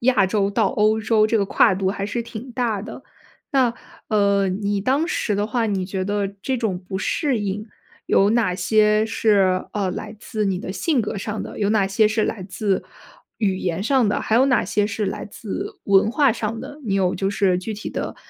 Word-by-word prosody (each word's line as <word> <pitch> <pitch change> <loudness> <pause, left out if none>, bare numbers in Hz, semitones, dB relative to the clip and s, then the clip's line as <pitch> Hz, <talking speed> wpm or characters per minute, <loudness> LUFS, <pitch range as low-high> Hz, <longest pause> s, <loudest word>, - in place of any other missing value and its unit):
亚 240 -5 +3
洲 200 +1 +1
到 200 - +2
欧 215 -2 +2
洲 220 -1 +3
这 225 - +1
个 200 - +2
跨 190 - +4
度 190 0 -1
还 200 0 -3
是 235 +3 -2
挺 235 +2 -8
大 230 -5 -1
的。 220 - -9 0.5
那， 260 -4 +3 0.4
呃， 200 -2 +2
你 200 +1 -1
当 270 +10 +1
时 215 - -1
的 205 +1 0
话， 230 +1 0
你 195 -3 -1
觉 190 0 -3
得 205 0 0 0.2
这 265 -1 -1
种 215 -6 -1
不 190 +1 -6
适 270 +3 0
应 205 +1 -3 0.4
有 200 +1 +4
哪 220 -6 +2
些 215 +1 +3
是， 195 -4 +2
呃， 195 -3 -1
来 215 +4 -6
自 215 -1 -3
你 190 -2 0
的 185 - -5
性 290 - +1
格 215 -1 -3
上 210 +2 -4
的， - - -8
有 205 0 +1
哪 210 -3 +3
些 210 +2 +3
是 215 0 +1
来 200 -4 -3
自， 195 +1 -1 0.6
语 195 -4 0
言 175 -1 -2
上 255 -1 +3
的， 205 - 0
还 220 - 0
有 260 +3 +5
哪 255 -3 +2
些 205 +1 +1
是 205 0 -2
来 - - -4
自 375 - -6
文 200 +2 +4
化 275 -2 +3
上 225 0 -3
的， 290 +1 -9
你 200 - -1
有 185 -2 +1
就 195 0 -1
是 195 -3 +2
具 200 +5 -5
体 210 +1 -6
地 - - -4
210 Hz, 230 characters per minute, -22 LUFS, 195-225 Hz, 0.6 s, 有